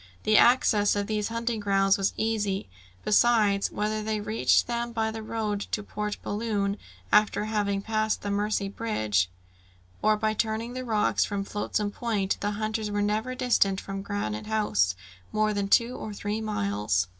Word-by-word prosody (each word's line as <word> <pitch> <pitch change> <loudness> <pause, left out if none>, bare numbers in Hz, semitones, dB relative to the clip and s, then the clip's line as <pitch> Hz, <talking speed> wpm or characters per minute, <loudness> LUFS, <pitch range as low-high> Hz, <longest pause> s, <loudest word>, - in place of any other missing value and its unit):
The 215 - +3
access 215 -4 +5
to 205 - 0
these 210 0 -1
hunting 230 0 -2
grounds 195 -1 +3
was 195 0 0
easy; 210 -3 -1 0.4
besides, 210 -2 +3
whether 215 +1 -1
they 215 0 -2
reached 215 +2 +2
them 235 0 -3
by 220 -1 0
the 220 0 -6
road 215 -2 -2
to 210 - -1
Port 210 0 -4
Balloon, 205 -2 -1 0.4
after 210 0 +4
having 205 -2 -1
passed 215 0 0
the 205 - -2
Mercy 205 0 0
Bridge, 110 - 0 0.7
or 215 0 +3
by 215 0 0
turning 225 +2 -2
the 255 0 -4
rocks 215 -3 +2
from 200 -1 -2
Flotsam 205 +1 -2
Point, 205 -4 -1
the 205 - -1
hunters 215 0 -2
were 205 0 0
never 215 +5 -1
distant 200 -6 +2
from 195 -1 -5
Granite 195 - -3
House 105 - +1 0.4
more 215 0 +1
than 200 -1 -1
two 235 +5 +3
or 210 -1 -6
three 205 +2 -3
miles. 100 - 0
210 Hz, 165 wpm, -27 LUFS, 200-220 Hz, 0.7 s, access